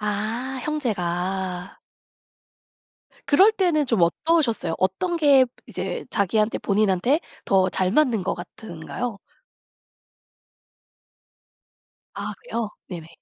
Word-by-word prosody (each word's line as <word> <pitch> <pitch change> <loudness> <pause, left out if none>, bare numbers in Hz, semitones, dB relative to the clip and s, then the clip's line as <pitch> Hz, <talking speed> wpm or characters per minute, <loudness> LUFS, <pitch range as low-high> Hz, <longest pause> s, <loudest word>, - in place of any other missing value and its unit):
아 220 +5 -2
형제가. 185 - -2 1.5
그럴 385 +9 +6
때는 345 -9 +2
좀 225 -7 +2
어떠셨어요? 230 - +1
어떤 190 - 0
게 285 -5 +6 0.2
이제 - - -4
자기한테 210 +2 +1
본인한테 210 - +2 0.2
더 190 -1 +3
잘 185 0 0
맞는 240 -4 +3
것 - - -1
같은가요? 195 +5 -6 3.0
아 - - -4
그래요? 235 - -3 0.2
네네. 170 -4 -7
215 Hz, 190 characters per minute, -24 LUFS, 185-280 Hz, 3.0 s, 그럴